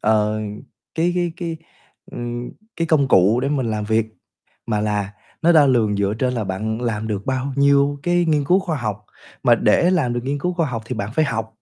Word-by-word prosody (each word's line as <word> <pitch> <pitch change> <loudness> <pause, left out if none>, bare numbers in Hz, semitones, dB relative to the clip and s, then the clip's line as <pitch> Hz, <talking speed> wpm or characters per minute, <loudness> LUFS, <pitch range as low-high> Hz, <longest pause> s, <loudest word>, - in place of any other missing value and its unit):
ờ, 110 0 +1 0.5
cái 175 +2 +1
cái 175 -2 0
cái, 170 -3 -4 0.6
ừm, 120 0 -5 0.3
cái 165 - -1
công 150 -4 +2
cụ 105 +4 +4
để 135 - -1
mình 140 -4 0
làm 105 -1 -2
việc, 110 +1 +1 0.6
mà 105 -2 0
là 105 -1 -1 0.3
nó 170 +1 +5
đo 155 -3 +6
lường 115 -6 +2
dựa 100 +1 0
trên 125 0 0
là 115 - -2
bạn 110 +4 -3
làm 110 -2 -2
được 100 -2 -4
bao 130 +1 -1
nhiêu 140 0 +3
cái 175 +1 +2
nghiên 150 -3 +1
cứu 180 +7 +4
khoa 170 -5 -3
học, 105 -4 -4 0.4
mà - - +5
để 175 - +3
làm 150 -10 +1
được 120 - -1
nghiên 140 +2 -2
cứu 180 +5 -2
khoa 170 -2 0
học 115 -4 -4
thì 125 - -4
bạn 105 0 -3
phải 155 - +3
học. 115 -5 -3
125 Hz, 215 wpm, -21 LUFS, 110-155 Hz, 0.6 s, đo